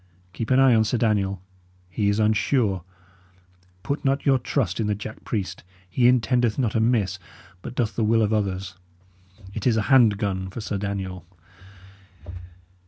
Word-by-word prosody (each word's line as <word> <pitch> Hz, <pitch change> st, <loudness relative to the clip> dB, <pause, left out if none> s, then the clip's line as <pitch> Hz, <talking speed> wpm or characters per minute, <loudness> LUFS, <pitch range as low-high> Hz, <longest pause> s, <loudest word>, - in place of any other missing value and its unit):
Keep 110 Hz, +5 st, -5 dB
an 130 Hz, -, +4 dB
eye 135 Hz, -2 st, +6 dB
on 110 Hz, -1 st, +4 dB
Sir 110 Hz, +3 st, 0 dB
Daniel; 100 Hz, -5 st, 0 dB, 0.4 s
he 100 Hz, +3 st, -1 dB
is 100 Hz, -, +1 dB
unsure. 110 Hz, -, +1 dB, 1.0 s
Put 140 Hz, -, -3 dB
not 135 Hz, 0 st, 0 dB
your 135 Hz, -2 st, +4 dB
trust 120 Hz, -6 st, -1 dB
in 110 Hz, -, 0 dB
the 105 Hz, -, 0 dB
jack 105 Hz, +2 st, -9 dB
priest; 95 Hz, -5 st, -4 dB, 0.2 s
he 120 Hz, +7 st, +2 dB
intendeth 120 Hz, -2 st, +2 dB
not 120 Hz, -5 st, 0 dB
amiss, 110 Hz, -4 st, +1 dB, 0.4 s
but -, -, -8 dB
doth 120 Hz, -3 st, -1 dB
the 115 Hz, -, 0 dB
will 115 Hz, +1 st, +3 dB
of 105 Hz, +1 st, 0 dB
others; 95 Hz, -3 st, -2 dB, 0.8 s
it 110 Hz, +1 st, -2 dB
is 115 Hz, -3 st, +3 dB
a 110 Hz, -, +1 dB
hand 115 Hz, -6 st, +6 dB
gun 95 Hz, -2 st, -2 dB
for 100 Hz, -, -7 dB
Sir 100 Hz, -2 st, -3 dB
Daniel! 95 Hz, -3 st, -5 dB
110 Hz, 165 wpm, -24 LUFS, 100-120 Hz, 1.0 s, eye